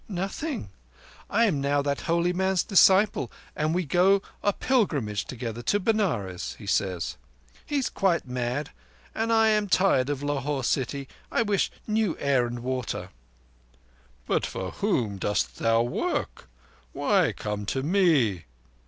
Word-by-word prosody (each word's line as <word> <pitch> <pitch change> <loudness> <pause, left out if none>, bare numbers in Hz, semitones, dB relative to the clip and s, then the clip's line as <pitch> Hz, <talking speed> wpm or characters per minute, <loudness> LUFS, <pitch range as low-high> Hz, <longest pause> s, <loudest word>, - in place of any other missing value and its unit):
"Nothing. 195 - -4 0.6
I 230 +3 +3
am 160 -10 +1
now 140 +1 +1
that 140 0 -1
holy 170 +1 +2
man's 190 0 +1
disciple; 190 - +4 0.2
and 155 +2 0
we 180 -1 0
go 190 +6 +3 0.2
a 205 - +2
pilgrimage 150 - 0
together—to 120 - -2
Benares, 160 - -1
he 105 - -11
says. 95 -4 -1 0.5
He 295 - -3
is 265 - -1
quite 185 -6 +1
mad, 125 +3 -2 0.4
and 225 +1 -1
I 225 -1 +5
am 210 -1 +2
tired 180 -9 +3
of 145 -1 -2
Lahore 145 -1 -1
city. 135 +2 -1 0.2
I 235 - +2
wish 205 -3 +1 0.2
new 215 -5 0
air 135 -4 +2
and 120 0 -6
water." 130 -1 -3 1.2
"But - - +1
for 95 0 -4
whom 120 - -1
dost 105 +1 -1
thou 115 0 +3
work? 120 - -3 0.4
Why - - +2
come 105 -1 -5
to 130 +4 -1
me?" 145 - +2
145 Hz, 140 wpm, -26 LUFS, 120-195 Hz, 1.2 s, I